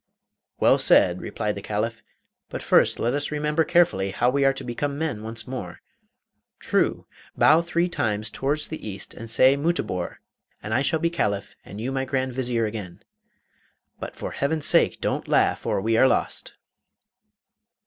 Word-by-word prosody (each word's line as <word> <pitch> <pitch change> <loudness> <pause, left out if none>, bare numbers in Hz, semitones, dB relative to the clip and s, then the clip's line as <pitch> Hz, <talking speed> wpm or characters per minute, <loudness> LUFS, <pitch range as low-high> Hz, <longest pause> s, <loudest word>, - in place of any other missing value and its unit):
'Well - - +4
said,' 90 0 +4
replied 105 -1 -3
the 100 - -7
Caliph; 110 +3 -3 0.5
'but - - -6
first - - +3
let 120 - 0
us 145 +1 -1
remember 150 +1 0
carefully 165 - +2
how 120 +6 +1
we 140 +1 +1
are 135 0 +4
to - - -7
become 140 +4 -3
men 150 -9 -3
once 110 +1 -5
more. 110 -9 -6 0.8
True! - - 0 0.3
Bow 155 +3 +5
three 170 +1 0
times 110 -9 -2
towards 145 +5 -1
the 155 - -7
east 100 -2 -6
and 115 0 -9
say 130 +4 +5
"Mutabor!" 140 - -2 0.5
and 110 - -4
I 130 - +2
shall 160 +3 +1
be 165 +1 0
Caliph 100 -11 -2
and 100 - -10
you 125 +4 -3
my 135 0 -1
Grand 130 -1 -2
Vizier 120 -3 -1
again. 105 -5 -7 1.0
But - - -7
for - - -6
Heaven's 145 +2 -1
sake - - +3
don't - - -2
laugh - - +1
or - - +1
we 110 +3 0
are 130 - +6
lost! - - -2
125 Hz, 170 wpm, -24 LUFS, 105-145 Hz, 1.0 s, are